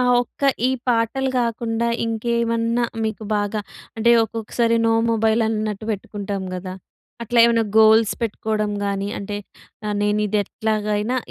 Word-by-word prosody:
ఆ - - +3 0.2
ఒక్క 245 - -17 0.3
ఈ - - +1 0.2
పాటలు 245 +3 +1
కాకుండా, 230 0 -1 0.2
ఇంకేమన్నా 230 +1 0 0.2
మీకు 220 0 -3
బాగా 205 +1 -1 0.4
అంటే, 235 +2 +3
ఒక్కొక్కసారి 230 +1 -1
నో 225 - +3 0.2
మొబైల్ 225 0 +2
అన్నట్టు 215 -1 -2
పెట్టుకుంటాం 200 -1 -5
గదా! 185 0 -5 0.5
అట్లా 235 +1 0
ఏమైనా 230 -1 +3 0.2
గోల్స్ 220 0 +6
పెట్టుకోవడం 215 -1 -1
గాని, 200 0 -2
అంటే 205 +1 -5 0.5
ఆహ్, 210 - -1
నేను 210 0 +1
ఇది 210 +1 0
ఎట్లాగైనా 215 +3 -1
220 Hz, 135 wpm, -21 LUFS, 210-230 Hz, 0.5 s, గోల్స్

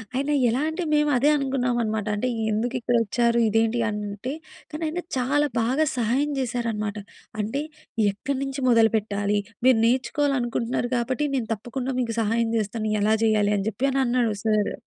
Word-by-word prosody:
ఆయన 280 +3 0
యెలా 240 +3 +2
అంటే 345 +3 -3
మేమదే 295 -2 +3
అనుకున్నాం 260 -3 0
అనమాట. 215 -1 -2
అంటే 230 +5 -1 0.2
ఎందుకిక్కడొచ్చారు? 235 0 +1
ఇదేంటి 225 +2 +2
అంటే 210 +4 -4 0.4
కానీ 305 +2 -5
ఆయన 350 +3 -3 0.2
చాలా 290 +4 +2
బాగా 265 +7 +2
సహాయం 255 +6 +1
జేశారనమాట. 225 -4 -2 0.4
అంటే 225 +7 -1 0.5
ఎక్కడ్నుంచి 270 +5 -3
మొదలుపెట్టాలి? 210 -3 +2 0.3
మీరు 260 -3 +6
నేర్చుకోవాలనుకుంటున్నారు 250 -2 0
గాబట్టి 255 +5 0
నేను 240 -3 -2
తప్పకుండా 255 +4 -4
మీకు 230 -2 -1
సహాయం 230 +2 +1
జేస్తాను 215 +1 -2
ఎలా 215 +1 +3
జేయాలి 210 -2 +3
అని 195 - -2
జెప్పి 255 +5 -1 0.2
అన్నాడు 240 -2 +1
సార్. 215 -1 +1
240 Hz, 135 wpm, -24 LUFS, 220-265 Hz, 0.5 s, మీరు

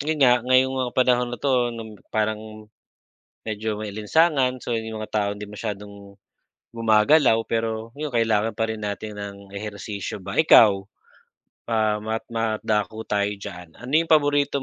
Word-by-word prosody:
yun 155 +2 -1
nga 125 -1 +5
ngayong 130 +2 +3
mga 125 -1 -1
panahon 125 -1 +3
na 120 - -5
'to 125 -3 +1
'no 110 -3 -8
parang 110 0 -1 1.1
medyo 110 0 -3
maalinsangan, 130 +6 +1
so 120 - -3
yung 110 -1 -4
mga 110 - -7
taong 100 -1 +1
hindi 105 - -7
masyadong 100 -1 -8 0.6
gumagalaw. 115 +3 +4
Pero 115 +1 -3
yun 150 -2 -4
kailangan 115 -2 +1
pa 110 +2 -2
rin 110 -1 -4
natin 105 +1 -5
ng 100 -1 -6 0.2
ehersisyo 100 -1 -6
ba, 95 +1 -7
ikaw 105 -11 +6 0.8
pa 110 -2 +1
mat 110 +1 -3
madako 110 -2 -1
tayo 105 -1 -1
diyan, 90 -4 -10
ano 125 +3 -9
yung 165 - 0
paborito 145 -2 +3
110 Hz, 150 wpm, -23 LUFS, 105-125 Hz, 1.1 s, ikaw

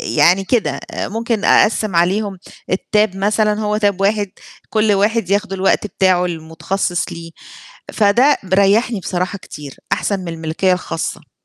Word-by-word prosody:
يعني 185 +3 +3
كده، 170 - 0
ممكن 225 0 -2
أقسّم 215 -4 +3
عليهم 195 +3 +1 0.3
الTab 210 +1 +1
مثلًا 210 +2 +1
هو 210 0 0
Tab 205 -3 +1
واحد 205 0 +1 0.4
كُلّ 215 -1 +2
واحد 205 0 +1
ياخد 205 0 0
الوقت 195 +2 +1
بتاعه 185 -2 +2
المتخصِّص 170 +2 -3
ليه، 165 0 -9 0.6
فده 235 +7 +3
ب 190 -1 -2
ريحني 205 +3 +3
بصراحة 180 +2 -3
كتير، 145 -6 -10 0.2
أحسن 200 -2 0
من 180 - -7
الملكية 165 +3 -1
الخاصة. 180 -2 -4
195 Hz, 135 wpm, -18 LUFS, 180-210 Hz, 0.6 s, يعني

